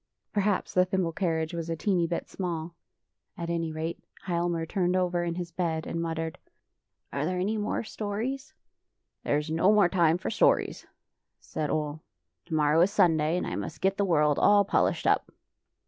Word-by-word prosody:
Perhaps 205 -1 0
the 180 - +5
thimble 185 -2 0
carriage 165 -2 -1
was 165 -1 -4
a 165 - -1
teeny 175 +1 +1
bit 170 - -3
small. 170 -3 -4 0.6
At 170 0 -3
any 165 -1 -1
rate 160 +2 -4 0.3
Hialmar 170 -2 0
turned 180 +1 0
over 180 -1 +1
in 170 -1 -2
his 175 -1 -5
bed 165 -2 -2
and 165 - -3
muttered, 165 -1 -3 0.4
" - - -30
Are 140 - -1
there 180 +4 -1
any 200 +4 0
more 210 +1 -1
stories? 240 +8 -4 0.2
" - - -56
" - - -56
There 145 - +1
is 150 +1 -3
no 165 +5 +4
more 205 -4 +5
time 170 -3 +3
for 185 - -4
stories,'' 220 - +2 0.5
said 155 -2 -4
Ole. 150 0 -2 0.2
" 85 0 -56
Tomorrow 155 0 +3
is 185 +3 +4
Sunday, 160 -1 +3
and - - -2
I - - -4
must - - -5
get 195 +1 +1
the 200 - +2
world 150 -6 +3
all 205 -1 +5
polished - - +1
up. - - +2
170 Hz, 190 wpm, -28 LUFS, 160-190 Hz, 0.6 s, the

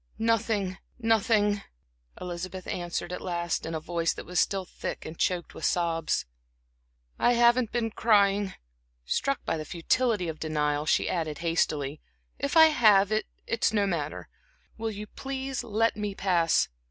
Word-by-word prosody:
"Nothing 220 -4 0 0.2
nothing," 220 -3 +2 0.6
Elizabeth 180 +1 -6
answered 175 0 -3
at - - -5
last, 170 -2 -2
in 165 - -3
a - - -1
voice 165 +1 -1
that - - -8
was 180 +1 -1
still 195 -1 +1
thick - - -6
and 160 - -7
choked 175 0 -1
with - - -10
sobs. 165 -2 0 0.9
"I 245 - +4
haven't 240 0 +4
been 230 -2 -1
crying 205 -2 +3
or," 190 - -11 0.5
struck 275 - -1
by - - 0
the 155 - -4
futility 180 - 0
of 160 -1 -5
denial, 150 -1 -1
she - - +2
added 160 -4 -2
hastily 150 -3 0 0.4
"if 280 +3 0
I 320 0 +9
have 210 -8 +5
it 215 0 0 0.2
it's 230 -1 +1
no 205 -2 +3
matter. 165 -6 -3 0.5
Will 225 0 -3
you 210 0 -6
please 265 +2 -4
let 225 0 +1
me 210 -1 -3
pass?" 175 -4 +2
195 Hz, 155 wpm, -28 LUFS, 170-225 Hz, 0.9 s, I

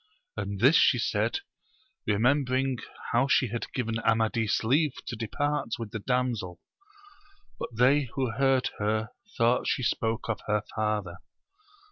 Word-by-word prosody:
And 100 -1 -4
this 130 +9 +6
she - - +5
said, 400 - 0 0.7
remembering 130 +3 +2 0.3
how 120 +4 +3
she 130 -2 +3
had 120 +1 -4
given 115 -3 -2
Amadis 110 -1 +1
leave 140 +5 +2
to - - -4
depart 145 +2 -2
with 115 -3 -6
the 110 - -4
damsel; 115 -7 -1 1.0
but - - -4
they 130 +5 +3
who 130 -4 0
heard 135 +2 +2
her 110 +1 0 0.3
thought 120 0 +2
she 130 - 0
spoke 115 0 -1
of 115 -3 -2
her 105 0 +1
father. 105 -5 -1
115 Hz, 135 wpm, -28 LUFS, 110-130 Hz, 1.0 s, this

